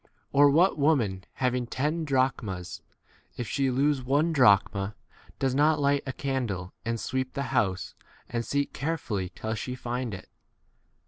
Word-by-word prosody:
Or, 145 +1 +6
what 165 +4 +4
woman 115 -11 +2
having 125 -2 0
ten 150 +7 -1
drachmas, 125 - -1 0.6
if 120 - -3
she 135 +2 +1
lose 135 +2 +2
one 145 +6 +2
drachma, 100 -5 +3 0.4
does 135 -2 0
not 150 +3 +3
light 140 0 +2
a - - -1
candle 120 -10 -3
and 115 0 -2
sweep 130 +2 -2
the 140 - -2
h 140 - -3
house 100 -8 0 0.3
and 120 0 -2
seek 140 +3 -1
carefully 125 - -2
till 110 0 -3
she 125 +3 -4
find 125 -3 -3
it - - -11
130 Hz, 150 wpm, -28 LUFS, 110-140 Hz, 0.6 s, Or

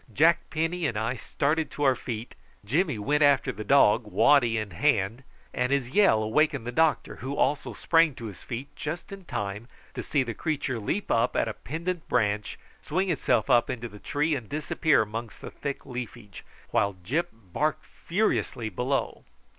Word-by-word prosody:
Jack 160 +8 +3
Penny 165 +1 -1
and 115 - -3
I 115 +4 -1
started 155 +5 -1
to 145 - -4
our 135 -2 +5
feet, 115 -1 -6 0.3
Jimmy 150 - +1
went 145 +8 0
after 145 -2 +4
the 110 - -7
dog, 115 -2 +4
waddy 120 0 +4
in 110 -2 -3
hand, 100 +7 +1 0.3
and 125 +1 0
his 135 -3 0
yell 140 - +4
awakened 140 +2 +1
the 120 - -3
doctor, 160 +3 +1
who 135 +2 -4
also 145 +1 0
sprang 165 -4 +3
to 115 - -8
his 100 -5 -8
feet 125 +4 -7
just 160 +5 -5
in 195 -2 -9
time 105 -3 -4 0.3
to - - -4
see 140 -3 +1
the 120 -2 -4
creature 140 -2 -2
leap 175 - -2
up 115 +2 +2
at - - +2
a 110 - -2
pendent 170 - -5
branch, 105 0 0 0.2
swing 185 +4 0
itself 160 - +1
up 120 -3 +4
in 125 - -3
the 115 -3 -7
tree, 150 +7 0
and 125 -7 -4
disappear 150 -2 +2
amongst 115 +2 -6
the - - -8
thick 140 -1 -5
leafage, 120 -5 -7 0.3
while 100 -1 +1
Gyp 160 - 0
barked 125 - -3
furiously 170 - -1
below. 125 +7 -2
130 Hz, 180 wpm, -27 LUFS, 110-155 Hz, 0.3 s, our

